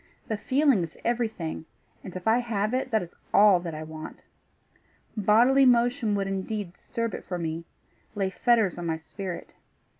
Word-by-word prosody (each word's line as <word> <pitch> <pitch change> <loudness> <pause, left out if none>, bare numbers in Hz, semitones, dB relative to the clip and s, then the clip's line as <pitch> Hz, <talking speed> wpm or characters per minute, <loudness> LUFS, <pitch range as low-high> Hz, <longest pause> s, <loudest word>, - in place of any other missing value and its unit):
The 220 - 0
feeling 265 0 +3
is 165 -1 -6
everything, 220 -10 -2 0.4
and 185 - -9
if 185 +3 -6
I 225 +2 +5
have 220 -2 -1
it, 260 0 -1
that 220 -5 +1
is 170 - -11 0.2
all 205 -3 +6
that 170 -2 -6
I 155 - -5
want. 155 0 -9 0.9
Bodily 235 +6 +5
motion 240 -3 +3
would 200 -1 0
indeed 195 -1 -3
disturb 230 +3 -4
it - - -6
for 180 - -4
me 165 0 -4 0.5
lay 195 -2 0
fetters 220 -4 +2
on 170 - -4
my 160 -1 0
spirit. 180 +2 -7
205 Hz, 170 wpm, -27 LUFS, 175-235 Hz, 0.9 s, all